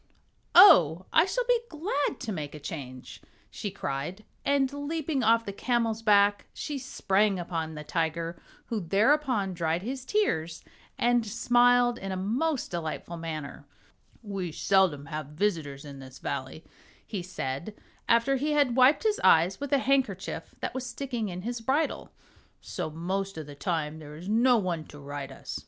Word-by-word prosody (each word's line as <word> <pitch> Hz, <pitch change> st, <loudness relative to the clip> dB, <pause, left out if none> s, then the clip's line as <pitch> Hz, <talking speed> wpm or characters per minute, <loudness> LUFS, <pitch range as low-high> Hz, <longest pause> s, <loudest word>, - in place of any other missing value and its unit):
"Oh, 180 Hz, -, +8 dB
I 320 Hz, -, +6 dB
shall -, -, -1 dB
be -, -, +4 dB
glad 305 Hz, -2 st, -2 dB
to 235 Hz, -4 st, -3 dB
make 155 Hz, -6 st, -5 dB
a -, -, -8 dB
change," 130 Hz, -4 st, -8 dB, 0.3 s
she 205 Hz, -, -4 dB
cried, 175 Hz, +3 st, -5 dB, 0.2 s
and 280 Hz, -1 st, +1 dB
leaping 285 Hz, 0 st, -2 dB
off 230 Hz, 0 st, +3 dB
the 200 Hz, -, -5 dB
camel's 230 Hz, 0 st, 0 dB
back 205 Hz, -2 st, +4 dB
she 290 Hz, -2 st, -4 dB
sprang 205 Hz, -5 st, +1 dB
upon 165 Hz, -2 st, -4 dB
the 150 Hz, -, -6 dB
tiger, 165 Hz, +2 st, -2 dB, 0.2 s
who 225 Hz, -, -2 dB
thereupon 210 Hz, -, +2 dB
dried 170 Hz, 0 st, -1 dB
his 260 Hz, +3 st, -4 dB
tears 170 Hz, -, -1 dB, 0.3 s
and 240 Hz, 0 st, +3 dB
smiled 245 Hz, +2 st, +3 dB
in 195 Hz, 0 st, -5 dB
a 190 Hz, -, -2 dB
most 250 Hz, +10 st, -1 dB
delightful 170 Hz, 0 st, -4 dB
manner. 155 Hz, -3 st, -6 dB, 0.6 s
"We 195 Hz, -5 st, -4 dB
seldom 170 Hz, -4 st, +2 dB
have 155 Hz, -2 st, -5 dB
visitors 150 Hz, -4 st, -2 dB
in 140 Hz, -1 st, -9 dB
this 130 Hz, -1 st, -11 dB
Valley," 135 Hz, +3 st, -5 dB, 0.4 s
he 200 Hz, -4 st, -4 dB
said, 175 Hz, +1 st, -5 dB, 0.3 s
after 235 Hz, +4 st, +4 dB
he 300 Hz, +3 st, 0 dB
had 285 Hz, -5 st, +3 dB
wiped 260 Hz, +7 st, +5 dB
his 430 Hz, -1 st, +1 dB
eyes 170 Hz, +4 st, +5 dB
with 285 Hz, 0 st, -5 dB
a 280 Hz, -, +5 dB
handkerchief 260 Hz, -8 st, -1 dB
that -, -, -3 dB
was 260 Hz, -, -4 dB
sticking 245 Hz, -3 st, -4 dB
in 180 Hz, 0 st, -6 dB
his 235 Hz, +1 st, -4 dB
bridle, 275 Hz, +7 st, -1 dB, 0.5 s
"so -, -, -5 dB
most 190 Hz, +5 st, -3 dB
of 155 Hz, -, -5 dB
the 145 Hz, -, -10 dB
time 155 Hz, +1 st, -2 dB
there 150 Hz, -1 st, -10 dB
is 170 Hz, +4 st, -9 dB
no 240 Hz, +4 st, +4 dB
one 180 Hz, -6 st, -2 dB
to 145 Hz, -, -13 dB
ride 145 Hz, -1 st, -6 dB
us. -, -, -7 dB
195 Hz, 165 wpm, -28 LUFS, 160-250 Hz, 0.6 s, Oh